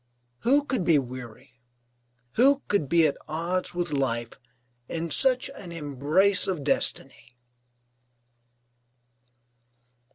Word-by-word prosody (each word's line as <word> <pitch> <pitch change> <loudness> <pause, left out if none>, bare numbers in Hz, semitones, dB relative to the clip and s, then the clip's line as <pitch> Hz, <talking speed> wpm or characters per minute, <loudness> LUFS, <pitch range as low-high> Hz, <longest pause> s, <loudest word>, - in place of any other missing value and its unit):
Who 280 +4 +3
could 260 -8 -2
be 165 -3 +4
weary, 125 -2 -7 0.7
who 275 - +3
could 160 -10 0
be 170 0 +4
at 145 - +1
odds 170 +4 -3
with 175 -2 -2
life, 120 -5 -1 0.6
in 165 0 -4
such 255 - +2
an 200 -11 -10
embrace 160 +5 +2
of 180 -7 -2
destiny? 130 -3 -1
165 Hz, 100 wpm, -26 LUFS, 135-195 Hz, 0.7 s, be